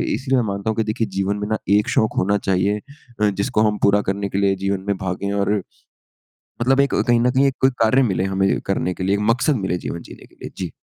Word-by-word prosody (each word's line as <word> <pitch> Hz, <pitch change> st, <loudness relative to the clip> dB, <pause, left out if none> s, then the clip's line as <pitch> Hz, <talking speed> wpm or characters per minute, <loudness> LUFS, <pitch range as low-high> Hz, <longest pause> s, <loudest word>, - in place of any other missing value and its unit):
इसलिए 135 Hz, -1 st, 0 dB
मैं -, -, -1 dB
मानता 100 Hz, +2 st, -2 dB
हूँ 110 Hz, -, -3 dB
कि 115 Hz, -, +2 dB
देखिए 110 Hz, +1 st, -1 dB
जीवन 100 Hz, +1 st, 0 dB
में 105 Hz, 0 st, -3 dB
ना 110 Hz, 0 st, 0 dB, 0.2 s
एक 105 Hz, -, +1 dB
शौक़ 110 Hz, -, +1 dB
होना 100 Hz, +2 st, +2 dB
चाहिए 95 Hz, +2 st, +2 dB, 0.4 s
अ, 105 Hz, -, +4 dB
जिसको 105 Hz, +4 st, -1 dB
हम 105 Hz, 0 st, -2 dB
पूरा 100 Hz, +1 st, +4 dB
करने 100 Hz, +1 st, -2 dB
के 95 Hz, -, -3 dB
लिए 100 Hz, -1 st, +2 dB
जीवन 100 Hz, -1 st, -1 dB
में 100 Hz, -, +1 dB
भागें। 95 Hz, +2 st, -3 dB
और 100 Hz, 0 st, 0 dB, 1.1 s
मतलब 135 Hz, +3 st, +3 dB
एक 140 Hz, 0 st, +2 dB
कहीं 120 Hz, -1 st, +4 dB
न 125 Hz, -, +3 dB
कहीं 135 Hz, +2 st, +3 dB
एक 135 Hz, -, -1 dB
कोई 130 Hz, -, +5 dB
कार्य 115 Hz, +4 st, +4 dB
मिले 95 Hz, -6 st, 0 dB
हमें 95 Hz, 0 st, +1 dB
करने 90 Hz, -, -1 dB
के 90 Hz, -, -6 dB
लिए, 95 Hz, +2 st, +2 dB
एक 100 Hz, -, -2 dB
मक़सद 135 Hz, +5 st, +1 dB
मिले 95 Hz, -5 st, -1 dB
जीवन 85 Hz, -1 st, -5 dB
जीने -, -, -13 dB
के -, -, -25 dB
लिए। -, -, -5 dB
जी। 90 Hz, -4 st, -4 dB
100 Hz, 250 wpm, -21 LUFS, 95-115 Hz, 1.1 s, कोई